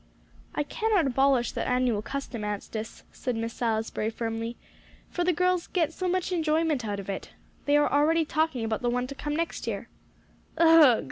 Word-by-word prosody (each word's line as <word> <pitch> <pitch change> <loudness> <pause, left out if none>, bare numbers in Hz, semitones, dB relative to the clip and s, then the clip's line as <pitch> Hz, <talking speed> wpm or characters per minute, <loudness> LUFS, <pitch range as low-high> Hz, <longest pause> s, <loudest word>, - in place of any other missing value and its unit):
"I 295 - +1
cannot 430 0 +1
abolish 265 -2 +2
that - - -3
annual 250 -4 +1
custom, 265 -2 -5
Anstice," 210 +2 -5
said 250 -2 -3
Miss 230 0 -3
Salisbury 220 -2 -1
firmly, 230 +1 -4 0.5
"for 350 - -1
the 360 - +3
girls 360 +1 +1
get 330 -3 0
so 370 - -3
much 370 +1 0
enjoyment 315 -4 +1
out 205 -2 -3
of 195 - -8
it. 195 -1 -5 0.4
They 290 0 +4
are 295 - +4
already 315 +3 +3
talking 305 -6 0
about 220 -1 -2
the 245 - +1
one 250 +1 0
to 270 - -7
come 295 +2 -3
next 335 +1 -3
year." - - -4 0.7
"Ugh!" 320 -7 +7
275 Hz, 180 wpm, -27 LUFS, 230-325 Hz, 0.7 s, Ugh